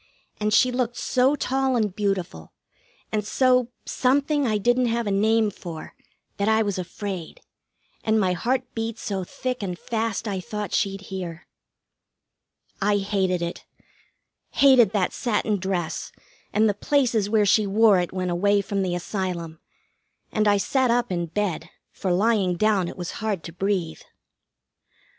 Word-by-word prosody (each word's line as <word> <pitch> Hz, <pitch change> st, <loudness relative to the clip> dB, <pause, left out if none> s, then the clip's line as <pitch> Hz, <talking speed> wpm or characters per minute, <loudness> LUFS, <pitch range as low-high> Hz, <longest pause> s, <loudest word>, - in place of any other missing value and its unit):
And 210 Hz, 0 st, 0 dB
she 250 Hz, +4 st, +4 dB
looked 245 Hz, -1 st, -1 dB
so 260 Hz, +3 st, +2 dB
tall 265 Hz, -1 st, 0 dB
and 210 Hz, -5 st, 0 dB
beautiful, 190 Hz, -, -2 dB, 0.6 s
and 215 Hz, -1 st, 0 dB
so 250 Hz, +2 st, +3 dB, 0.2 s
something 280 Hz, +2 st, +1 dB
I 215 Hz, -2 st, +1 dB
didn't 245 Hz, +4 st, +2 dB
have 235 Hz, 0 st, 0 dB
a 205 Hz, -, -1 dB
name 215 Hz, +2 st, +2 dB
for, 165 Hz, -4 st, -8 dB, 0.4 s
that 200 Hz, +2 st, +1 dB
I 220 Hz, 0 st, +4 dB
was 200 Hz, -3 st, -2 dB
afraid, 185 Hz, -1 st, -6 dB, 0.6 s
and 220 Hz, 0 st, +2 dB
my 185 Hz, -3 st, +2 dB
heart 255 Hz, +8 st, 0 dB
beat 225 Hz, 0 st, -3 dB
so 195 Hz, -2 st, -3 dB
thick 255 Hz, +7 st, -4 dB
and 180 Hz, -3 st, -3 dB
fast 225 Hz, +1 st, -2 dB
I 195 Hz, -2 st, -2 dB
thought 210 Hz, +1 st, -5 dB
she'd 195 Hz, 0 st, 0 dB
hear. 175 Hz, -3 st, -6 dB, 1.4 s
I 205 Hz, +1 st, +3 dB
hated 190 Hz, -3 st, 0 dB
it. 170 Hz, -, -5 dB, 0.9 s
Hated 260 Hz, -6 st, +6 dB
that 195 Hz, -4 st, +1 dB
satin 215 Hz, -3 st, 0 dB
dress, 185 Hz, -3 st, -3 dB, 0.4 s
and 215 Hz, +1 st, +3 dB
the 205 Hz, -, +2 dB
places 230 Hz, -2 st, +1 dB
where 215 Hz, -1 st, +3 dB
she 210 Hz, +1 st, +3 dB
wore 210 Hz, -1 st, +5 dB
it 175 Hz, -, -2 dB
when 185 Hz, -1 st, -2 dB
away 200 Hz, +3 st, +2 dB
from 200 Hz, 0 st, -2 dB
the 180 Hz, -2 st, -1 dB
Asylum; 175 Hz, -3 st, -4 dB, 0.7 s
and 215 Hz, 0 st, +1 dB
I 205 Hz, 0 st, +5 dB
sat 260 Hz, +5 st, +1 dB
up 240 Hz, -3 st, +1 dB
in 175 Hz, -1 st, -1 dB
bed, 195 Hz, 0 st, -2 dB, 0.2 s
for 190 Hz, -, -3 dB
lying 195 Hz, -1 st, +2 dB
down 205 Hz, -3 st, +2 dB
it -, -, -8 dB
was 175 Hz, -1 st, -4 dB
hard 210 Hz, -6 st, -2 dB
to 165 Hz, -, -7 dB
breathe. 180 Hz, -3 st, -2 dB
205 Hz, 155 wpm, -24 LUFS, 185-230 Hz, 1.4 s, Hated